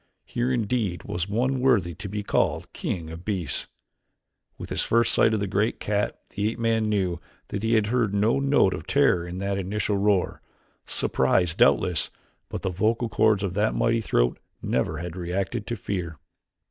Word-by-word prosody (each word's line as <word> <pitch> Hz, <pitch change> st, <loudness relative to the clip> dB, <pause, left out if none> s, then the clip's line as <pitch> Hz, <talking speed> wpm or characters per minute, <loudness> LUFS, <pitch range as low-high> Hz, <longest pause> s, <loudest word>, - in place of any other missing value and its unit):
Here 120 Hz, +2 st, -1 dB
indeed 110 Hz, -6 st, -1 dB
was 90 Hz, +2 st, -3 dB
one 130 Hz, +5 st, 0 dB
worthy 120 Hz, -10 st, +2 dB
to 95 Hz, +5 st, -7 dB
be 105 Hz, +1 st, -3 dB
called -, -, 0 dB
king 80 Hz, -3 st, -4 dB
of 80 Hz, +2 st, -9 dB
beasts. 90 Hz, -8 st, -1 dB, 0.9 s
With -, -, -8 dB
his -, -, +1 dB
first 115 Hz, +1 st, +3 dB
sight 110 Hz, -, +4 dB
of 110 Hz, -, +1 dB
the 100 Hz, -, -1 dB
great 100 Hz, +4 st, 0 dB
cat 105 Hz, 0 st, -1 dB
the 105 Hz, +1 st, -1 dB
ape 115 Hz, -, -6 dB
man 115 Hz, -2 st, +1 dB
knew 95 Hz, -5 st, 0 dB, 0.3 s
that 100 Hz, -, -3 dB
he 115 Hz, +1 st, +2 dB
had 110 Hz, -2 st, +3 dB
heard 115 Hz, -1 st, +1 dB
no 105 Hz, +6 st, +2 dB
note 140 Hz, -8 st, +3 dB
of -, -, -7 dB
terror 85 Hz, -1 st, +3 dB
in 90 Hz, +1 st, -6 dB
that 100 Hz, +1 st, -1 dB
initial 100 Hz, +2 st, -1 dB
roar; 100 Hz, -2 st, +1 dB, 0.5 s
surprise 90 Hz, -3 st, +2 dB
doubtless, 90 Hz, 0 st, +3 dB, 0.4 s
but -, -, -5 dB
the -, -, 0 dB
vocal 110 Hz, +5 st, 0 dB
chords 105 Hz, -1 st, +3 dB
of 95 Hz, -3 st, -2 dB
that 105 Hz, +3 st, +1 dB
mighty 115 Hz, 0 st, +2 dB
throat -, -, +1 dB, 0.2 s
never 70 Hz, +5 st, -1 dB
had 85 Hz, +1 st, -6 dB
reacted 95 Hz, +5 st, -3 dB
to 120 Hz, -, -2 dB
fear. 90 Hz, -6 st, -4 dB
100 Hz, 180 wpm, -25 LUFS, 90-115 Hz, 0.9 s, sight